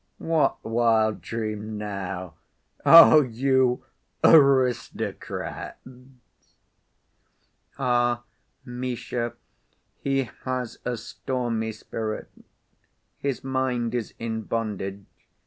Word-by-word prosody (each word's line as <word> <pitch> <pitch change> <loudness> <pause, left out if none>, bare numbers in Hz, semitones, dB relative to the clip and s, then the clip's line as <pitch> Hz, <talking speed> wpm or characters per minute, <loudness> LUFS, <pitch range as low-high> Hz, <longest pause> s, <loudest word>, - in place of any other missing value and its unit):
"What 160 -4 0
wild 115 -2 +2
dream 110 -1 -4
now? 100 -4 -5 0.5
Oh, 165 -2 +9
you—aristocrats!" 130 0 +1 2.0
"Ah, 120 -1 +1 0.4
Misha, 125 -1 -4 0.7
he 135 -1 0 0.2
has 125 -2 -3
a 125 -1 -1
stormy 115 -1 -3
spirit. 110 0 -5 0.9
His 140 -4 -3
mind 130 -3 -1
is 120 -3 -3
in 110 -1 -3
bondage. 100 -3 -4
120 Hz, 70 wpm, -25 LUFS, 110-130 Hz, 2.0 s, Oh